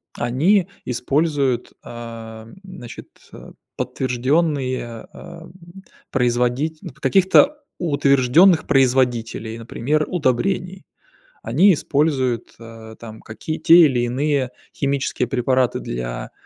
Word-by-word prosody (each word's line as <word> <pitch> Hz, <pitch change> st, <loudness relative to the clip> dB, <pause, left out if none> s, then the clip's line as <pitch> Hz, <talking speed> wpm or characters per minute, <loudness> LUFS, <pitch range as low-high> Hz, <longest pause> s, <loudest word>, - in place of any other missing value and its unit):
они 170 Hz, +10 st, +1 dB, 0.2 s
используют, 135 Hz, 0 st, -1 dB
ам, 115 Hz, 0 st, -10 dB
значит, 185 Hz, -11 st, -11 dB, 0.3 s
э, -, -, -12 dB, 0.3 s
подтвержденные, 130 Hz, -2 st, -2 dB
а, 165 Hz, -1 st, -12 dB, 0.6 s
производить 125 Hz, +5 st, 0 dB
н -, -, -7 dB
каких-то 195 Hz, -, +3 dB, 0.2 s
утвержденных 145 Hz, +2 st, +3 dB
производителей, 125 Hz, -4 st, +1 dB
например 140 Hz, +6 st, -2 dB
удобрений. 180 Hz, +5 st, -1 dB, 0.6 s
Они 170 Hz, -, +4 dB
используют, 140 Hz, -5 st, -1 dB
а, 115 Hz, -1 st, -12 dB
там 110 Hz, -1 st, -11 dB
какие, 155 Hz, +8 st, -6 dB
те 170 Hz, -, +6 dB
или 125 Hz, -4 st, +1 dB
иные 130 Hz, +1 st, -1 dB, 0.2 s
химические 140 Hz, -3 st, -1 dB
препараты 130 Hz, 0 st, 0 dB
для, -, -, -6 dB
130 Hz, 90 wpm, -20 LUFS, 120-155 Hz, 0.6 s, те